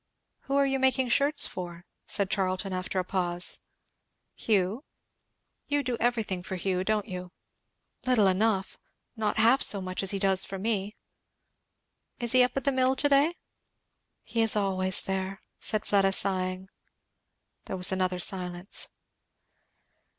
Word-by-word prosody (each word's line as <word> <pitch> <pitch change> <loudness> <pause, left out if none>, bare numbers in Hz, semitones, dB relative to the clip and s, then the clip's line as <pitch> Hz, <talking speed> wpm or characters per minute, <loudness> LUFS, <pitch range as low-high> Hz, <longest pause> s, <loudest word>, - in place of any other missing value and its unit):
"Who 275 - -2
are 280 0 +3
you 270 0 -1
making 260 -1 +1
shirts 285 +5 +3
for?" 175 -1 -6 0.2
said 200 -2 0
Charlton 190 0 -1
after 185 +1 -4
a 185 - +1
pause. 180 -1 +1 0.7
"Hugh." 210 +4 -1 0.8
"You 290 -1 0
do 250 -2 -2
everything 225 -6 -1
for 190 - -6
Hugh, 185 0 -1
don't 215 +1 -1
you?" 180 -2 -7 0.8
"Little 245 -5 +4
enough. 195 +1 +1 0.4
Not 215 -2 -2
half 235 +5 +4
so 200 - +6
much 185 -1 -4
as 195 - 0
he 200 - +1
does 195 -1 +4
for 195 - -6
me." 205 0 -2 1.2
"Is 240 -2 -2
he 255 - +5
up 250 +1 +1
at 270 - -1
the 280 - +2
mill 260 0 +2
to 290 +2 +1
day?" 285 +5 +3 0.9
"He 230 - -2
is 225 -1 +3
always 190 -2 +1
there," 190 +1 -4 0.2
said 215 -2 -1
Fleda 195 -1 +2
sighing. 185 -1 0 1.0
There 190 - -5
was 180 +2 +3
another 185 -1 0
silence. 180 0 -1
195 Hz, 145 wpm, -27 LUFS, 185-240 Hz, 1.2 s, so